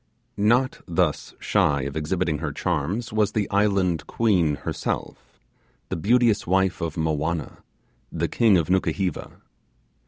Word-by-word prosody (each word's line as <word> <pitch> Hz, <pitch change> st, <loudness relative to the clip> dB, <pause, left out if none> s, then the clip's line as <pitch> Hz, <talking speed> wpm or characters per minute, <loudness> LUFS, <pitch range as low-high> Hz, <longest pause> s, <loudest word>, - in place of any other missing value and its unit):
Not 120 Hz, +6 st, +2 dB
thus 85 Hz, -3 st, -1 dB
shy 70 Hz, -2 st, +1 dB
of 70 Hz, 0 st, -5 dB
exhibiting 80 Hz, 0 st, -1 dB
her 75 Hz, -2 st, -3 dB
charms 90 Hz, -, -2 dB
was 105 Hz, -2 st, +1 dB
the 105 Hz, -2 st, 0 dB
Island 100 Hz, -5 st, +1 dB
Queen 90 Hz, -10 st, +2 dB
herself, -, -, -5 dB, 0.5 s
the -, -, -2 dB
beauteous 115 Hz, +3 st, +2 dB
wife 95 Hz, +1 st, +1 dB
of 80 Hz, -2 st, -3 dB
Movianna, 80 Hz, 0 st, -2 dB, 0.5 s
the -, -, -1 dB
king 110 Hz, -5 st, +4 dB
of 80 Hz, -, 0 dB
Nukuheva. 95 Hz, -1 st, -1 dB
90 Hz, 125 wpm, -24 LUFS, 80-105 Hz, 0.5 s, king